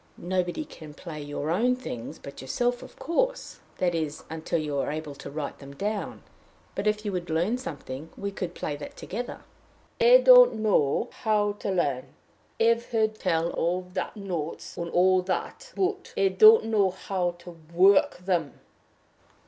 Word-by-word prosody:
"Nobody 180 - -2
can 150 - -12
play 155 -3 -8
your 145 +1 -3
own 240 +8 +2
things 125 - -7
but 140 - -10
yourself, 245 - -1
of - - -13
course - - -1 0.2
that 180 -1 +1
is, 155 -3 -3
until 160 +1 -2
you 150 -3 -2
are 140 - -1
able 155 -1 -5
to 140 - -9
write 145 0 -5
them 140 0 -11
down; 205 +5 -3 0.5
but, 200 - -2
if 210 0 0
you 205 - -1
would 180 -2 -4
learn 175 +10 0
something, 160 - -7
we 200 0 -3
could 185 -3 -5
play 145 - -3
that 145 - -9
together." 240 +5 -6 0.6
"I 485 +1 +8
don't - - +8
know 215 - +1
how 210 -3 +2
to - - -3
learn. 145 -9 -1 0.4
I've 230 +1 +3
heard 220 -2 +1
tell 170 -2 0
of 180 +2 -1
the 185 - -2
notes 180 -7 -5
and 170 -1 -4
all 185 +2 +4
that, 320 - -4
but 385 0 -2
I 195 0 +4
don't 435 - +7
know 210 -4 +3
how 180 -1 -2
to 170 -1 -12
work 190 +3 +5
them." 175 -6 -1
185 Hz, 165 wpm, -27 LUFS, 160-220 Hz, 0.6 s, I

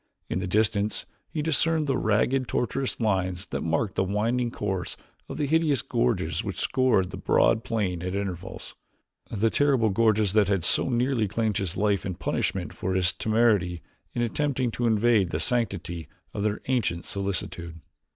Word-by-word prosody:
In - - 0
the 95 - -3
distance 105 +1 +1 0.2
he 150 - -3
discerned 160 0 +2
the 135 -2 +1
ragged 125 +4 +1
tortuous 130 +3 -1
lines 95 -4 0
that - - -2
marked 85 +5 0
the - - +1
winding 115 +5 0
course 95 -5 -3 0.3
of - - -5
the 150 - 0
hideous 150 -3 +2
gorges 60 - 0
which - - -4
scored 120 -8 +2
the - - -6
broad 110 0 +3
plain 100 -7 -1
at 90 +1 -3
intervals 95 -2 -5 0.6
the 110 +1 +1
terrible 135 -6 +3
gorges 110 -1 +2
that 105 -2 +4
had 95 -4 0
so - - +3
nearly 120 -2 +1
claimed 110 +1 -1
his 95 -6 -2
life 100 -2 +1
in 95 -2 -3
punishment - - -2
for 95 0 -2
his 95 -1 +3
temerity 105 -7 +1 0.3
in 120 - +1
attempting 130 0 0
to 120 +1 -1
invade 110 -3 +3
the 75 - -2
sanctity 90 - -1 0.3
of 100 - -3
their 105 0 -1
ancient 110 -10 0
solitude. 85 -4 -4
105 Hz, 165 wpm, -26 LUFS, 95-120 Hz, 0.6 s, that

